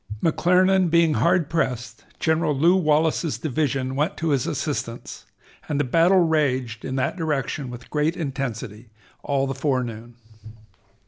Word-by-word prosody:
McClernand 180 +2 +3
being 165 -1 +3
hard 170 0 +2
pressed, 125 -9 -3
General 160 -3 +1
Lew 170 +6 +4
Wallace's 160 -2 +1
division 135 -3 -2
went 150 +7 -1
to 165 - -1
his 140 -4 +1
assistance, - - -4 0.4
and 145 -2 -1
the - - +2
battle 170 +8 +4
raged 130 -8 0
in 130 - -4
that 130 - -1
direction 150 -4 -2
with 125 0 -10
great 150 +3 0
intensity 120 - -5 0.3
all 140 -1 0
the 135 - -3
forenoon. 120 -4 -3
150 Hz, 135 wpm, -23 LUFS, 130-165 Hz, 0.4 s, Lew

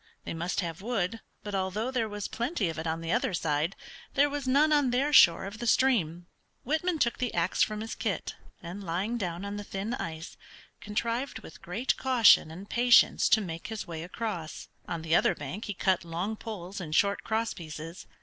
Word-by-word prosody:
They - - -4
must 170 +4 -1
have 170 -1 -5
wood, 225 -1 -2 0.2
but 205 - -6
although 195 +6 -1
there 230 -4 0
was 205 -1 -4
plenty 235 - -1
of 160 - -5
it 160 - -3
on 160 +1 -2
the 165 0 -3
other 225 -4 +1
side, 155 +3 0 0.4
there 285 +1 +4
was 285 -2 -3
none 295 +4 +4
on 290 -3 +3
their 270 +4 +1
shore 170 -7 +7
of 200 +3 -7
the 240 - -3
stream. 180 -10 +2 0.4
Whitman 320 +5 0
took 235 -5 +1
the 250 -2 -1
ax 170 +1 +1
from 215 0 +1
his 225 - -5
kit, - - -3 0.3
and 180 +4 -7
lying 195 +7 -2
down 180 -1 -3
on 200 0 -4
the 205 - -5
thin 200 +3 -4
ice, 160 -5 -6 0.4
contrived 230 +3 -2
with - - -12
great 200 +9 -1
caution 250 -10 +5
and 180 +5 -9
patience 240 +2 +5
to 220 - +5
make 165 -4 -6
his 220 -1 -5
way 165 -2 -6
across. 175 -3 -5 0.2
On 165 -2 -4
the 160 0 +2
other - - +3
bank 145 +10 -6
he 205 - -4
cut 185 -1 +1
long 175 +6 -3
poles 200 -4 -7
and 155 -3 -4
short 200 +1 +2
cross 225 +1 -1
pieces. 165 +1 -8
200 Hz, 200 wpm, -29 LUFS, 170-235 Hz, 0.4 s, shore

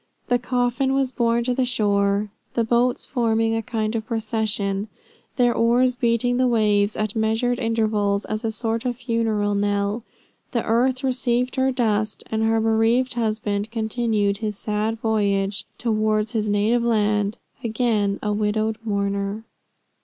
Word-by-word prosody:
The 245 0 +3
coffin 250 +2 0
was 270 -2 +1
borne 235 -2 +1
to 250 +1 0
the 260 - +1
shore; 205 -3 +1 0.2
the 235 - +2
boats 240 +2 +1
forming 225 -3 +1
a 225 - 0
kind 220 -1 -2
of 220 -1 -3
procession, 215 -3 -1 0.5
their 245 -2 +3
oars 245 +3 +3
beating 245 0 +1
the 255 0 +3
waves 210 -3 +2
at 215 0 -2
measured 225 +3 +1
intervals, 215 -3 0
as 215 +2 -4
a 225 - 0
sort 225 +1 -2
of 250 -1 -1
funeral 225 -4 0
knell 205 +2 0 0.5
The 235 - 0
earth 255 +4 +1
received 250 -1 0
her 265 0 +2
dust, 215 -4 0
and 220 0 0
her 225 0 +2
bereaved 225 +3 +2
husband 215 -3 -1
continued 220 -3 0
his 210 -2 -3
sad 215 +2 -1
voyage 200 -3 0
towards 215 -1 0
his 215 -3 -1
native 210 +4 +2
land, 210 -2 +1 0.3
again 220 -3 0
a 210 -1 0
widowed 215 +1 0
mourner. 200 0 -2
225 Hz, 145 wpm, -23 LUFS, 210-240 Hz, 0.5 s, The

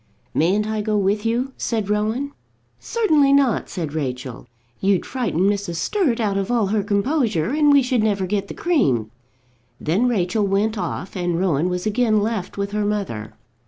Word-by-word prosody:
"Mayn't 190 +7 +2
I 215 -1 -1
go 210 0 0
with 205 +2 +1
you?" 250 +4 -1
said 220 -4 -2
Rowan. 215 +7 -1 0.5
"Certainly 310 -12 +2
not," 275 -5 +2
said 160 -6 -4
Rachel. 125 -5 -4 0.3
"You'd 195 -2 +1
frighten 225 -10 -2
Mrs. 200 -2 0
Sturt 265 - 0
out 205 -3 0
of 195 -1 -2
all 235 -3 +2
her 215 - +2
composure, 205 - 0
and 295 0 +4
we 280 -1 +6
should 250 -2 +1
never 205 -3 +1
get 200 +1 -1
the - - -8
cream." 135 - +1 0.7
Then 185 +11 +1
Rachel 205 -2 +1
went 205 +3 +1
off, 185 -1 -4
and 175 -2 -1
Rowan 175 -2 +1
was 180 +1 -3
again 215 0 +2
left 210 -3 -3
with 200 0 -2
her 210 0 -1
mother. 145 - -3
205 Hz, 170 wpm, -21 LUFS, 180-235 Hz, 0.7 s, we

